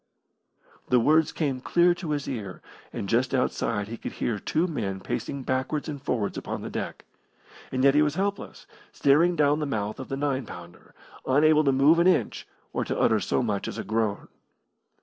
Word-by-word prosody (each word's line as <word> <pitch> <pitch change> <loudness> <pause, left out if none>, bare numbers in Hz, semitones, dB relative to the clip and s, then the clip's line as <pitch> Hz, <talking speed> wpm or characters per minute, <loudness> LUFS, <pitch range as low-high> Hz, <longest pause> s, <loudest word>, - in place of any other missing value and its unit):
The 125 - +5
words 155 +6 +3
came 135 -5 -2
clear 175 +5 +3
to 175 -2 -7
his 145 -2 -2
ear, 105 -8 -6 0.3
and 100 - -5
just 125 +5 +1
outside 115 -4 -1
he 115 +1 -6
could - - -7
hear 110 -4 -2
two 160 - 0
men 100 - -3
pacing 135 +7 -4
backwards 130 +4 -2
and 145 -3 -5
forwards 115 -7 -2
upon - - -5
the - - -6
deck. - - -5 0.7
And 130 0 -1
yet 140 0 +6
he 150 - +4
was 150 0 +1
helpless, 200 +2 -3 0.3
staring 165 +6 +3
down 150 -1 +3
the 150 - -2
mouth 105 -4 -3
of 130 - -7
the 135 - -3
nine 135 -4 -1
pounder, 85 0 -12 0.3
unable 155 +3 +4
to 135 - +4
move 140 +5 +5
an 170 - +4
inch 185 - +1 0.3
or - - 0
to - - -3
utter 110 -2 +3
so 125 - 0
much 105 -4 -2
as - - -5
a - - -3
groan. 110 -2 -1
135 Hz, 190 wpm, -26 LUFS, 115-155 Hz, 0.7 s, yet